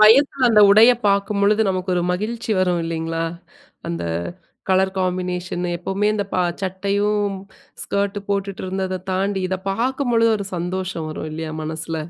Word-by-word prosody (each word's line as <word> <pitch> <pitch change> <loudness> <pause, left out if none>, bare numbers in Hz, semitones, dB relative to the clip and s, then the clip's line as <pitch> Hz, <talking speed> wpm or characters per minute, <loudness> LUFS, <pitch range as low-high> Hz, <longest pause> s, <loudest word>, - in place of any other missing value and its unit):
வயதுல 255 +3 +6
அந்த 220 -2 +5
உடைய 220 +4 +8 0.2
பார்க்கும்பொழுது 200 +1 +2
நமக்கு 185 0 -1
ஒரு 175 - +1
மகிழ்ச்சி 220 +5 -3
வரும் 180 -2 +2
இல்லிங்களா? 165 0 -2 0.7
அந்த 85 0 -3 0.7
கலர் 190 0 +3
காம்பினேஷன் 180 -1 -2
எப்பவுமே 200 +4 -1
இந்த 205 - -1
பா 185 - +2 0.2
சட்டையும், 200 +2 0 0.5
ஸ்கர்ட் 200 0 -1
போட்டுட்டு 195 -1 -2
இருந்ததை 185 0 -2
தாண்டி 195 +1 0
இதை 190 0 -1
பார்க்கும்பொழுது 235 0 +1
ஒரு 200 - -4
சந்தோஷம் 180 -1 -3
வரும் 155 0 -5
இல்லியா? 160 0 -5
மனசுல. 160 +1 -4
190 Hz, 135 wpm, -21 LUFS, 180-205 Hz, 0.7 s, உடைய